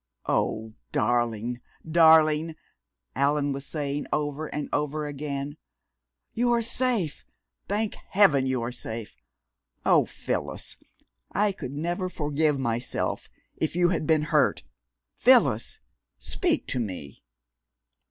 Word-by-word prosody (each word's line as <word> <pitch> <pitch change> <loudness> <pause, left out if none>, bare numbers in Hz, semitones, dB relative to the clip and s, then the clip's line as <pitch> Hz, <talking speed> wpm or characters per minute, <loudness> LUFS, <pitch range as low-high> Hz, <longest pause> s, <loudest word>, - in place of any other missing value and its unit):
"Oh, 110 0 -1 0.2
darling, 120 +1 0 0.3
darling!" 160 -1 +5 0.6
Allan 145 0 +2
was 140 0 -5
saying 145 -2 -3
over 150 +1 -1
and 150 0 -4
over 150 +1 -1
again. 145 0 -4 0.8
"You 240 +1 +2
are 235 - +2
safe 230 - 0 0.4
thank 210 +1 -1 0.2
heaven 160 -10 +4
you 130 -2 0
are 120 - -3
safe! 115 - -6 0.7
Oh, - - +5
Phyllis, - - -4 0.6
I 205 0 +2
could 135 -8 -7
never 175 +5 -2
forgive 150 -2 0
myself 120 -2 -2 0.3
if 160 - -1
you 175 0 +4
had 165 -4 -1
been 155 -2 +3
hurt! - - +3 0.5
Phyllis! - - +4 0.4
Speak - - 0
to 125 - -1
me!" 90 - -5
150 Hz, 115 wpm, -27 LUFS, 130-165 Hz, 0.8 s, darling